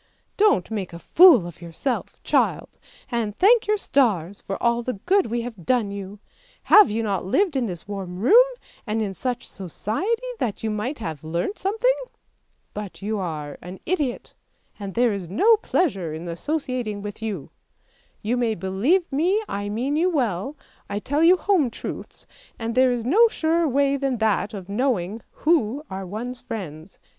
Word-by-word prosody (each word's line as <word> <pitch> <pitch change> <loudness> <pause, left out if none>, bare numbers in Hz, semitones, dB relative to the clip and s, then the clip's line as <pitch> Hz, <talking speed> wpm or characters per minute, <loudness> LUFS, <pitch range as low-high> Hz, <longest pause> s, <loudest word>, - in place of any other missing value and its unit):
Don't 405 - +3
make 195 -5 -4
a - - -6 0.2
fool 335 - +8
of 175 -1 -10
yourself, 170 - -4
child, - - 0 0.3
and 225 -3 -2
thank 435 +3 +5
your 425 0 +2
stars 205 - +1
for 195 - -4
all 235 0 +2
the 250 +1 -3
good 390 +1 +3
we 235 +1 -1
have 230 -6 -8
done 230 -1 +1
you! 200 0 -7 0.5
Have 420 -2 +7
you 225 +2 -1
not 200 -3 -1
lived 340 - +1
in 255 -3 +1
this 175 -1 -7
warm 190 -3 -5
room, 435 - +6 0.4
and 215 +1 -1
in 200 -2 -3
such 245 +4 -3
society 230 - -3
that 225 -3 -2
you 220 - 0
might 225 +8 -3
have 160 -9 -6
learnt 170 - -3
something? 450 +6 +2 0.8
But 205 -2 -7
you 215 0 -1
are 155 -5 -5
an 180 +2 -9
idiot, 295 -8 -2 0.5
and 200 -2 -6
there 240 -2 +3
is 190 -4 -5
no 430 - +5
pleasure 195 - -1
in 165 +2 -7
associating 240 - -3
with 205 +1 -7
you. 205 -9 -4 0.7
You 235 +4 0
may 235 -3 +1
believe 210 - +1
me 360 +10 +1
I 205 0 -3
mean 250 +7 -1
you 340 +4 +2
well, 260 - -1 0.3
I 200 - -2
tell 285 +8 -1
you 350 +3 +6
home 360 -10 +2
truths, - - -8 0.3
and 230 0 -3
there 255 +1 +4
is 240 -2 -2
no 425 - +6
surer 330 -5 +1
way 280 +1 +2
than 270 -2 -1
that 220 0 0
of 190 -3 -8
knowing 215 -2 -1 0.2
who 295 -4 +2
are 190 0 -5
one's 240 +6 -5
friends. 165 -5 -7
230 Hz, 170 wpm, -23 LUFS, 195-290 Hz, 0.8 s, fool